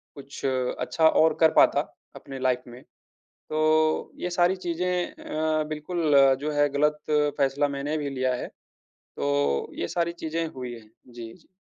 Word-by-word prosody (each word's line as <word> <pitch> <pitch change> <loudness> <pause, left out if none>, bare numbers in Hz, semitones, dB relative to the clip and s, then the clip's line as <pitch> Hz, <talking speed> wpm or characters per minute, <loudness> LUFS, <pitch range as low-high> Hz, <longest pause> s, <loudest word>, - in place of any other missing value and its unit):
कुछ 140 -1 -10
अच्छा 130 +5 +1
और 160 0 +4
कर 160 -1 +5
पाता, - - +5 0.4
अपनी 135 -1 -9
लाइफ़ 125 -1 -1
में। 120 +1 -12 0.7
तो 155 0 +1
ये 180 - -2
सारी 175 +1 +2
चीज़ें 180 0 -2
अ, 155 0 -2
बिल्कुल 155 +1 -1 0.3
जो 150 +1 -2
है 145 0 +2
गलत 150 +1 +2 0.4
फ़ैसला 140 +1 +1
मैंने 145 +3 -2
भी 145 -2 -3
लिया 130 -1 -1
है, - - -5 0.5
तो 70 -1 -2
ये 85 - -1
सारी 170 0 -1
चीज़ें 165 +1 -2
हुई 125 -2 -6
हैं। 110 -2 -15 0.2
जी, 115 -1 -9
जी। 175 - -22
150 Hz, 155 wpm, -26 LUFS, 130-160 Hz, 0.7 s, कर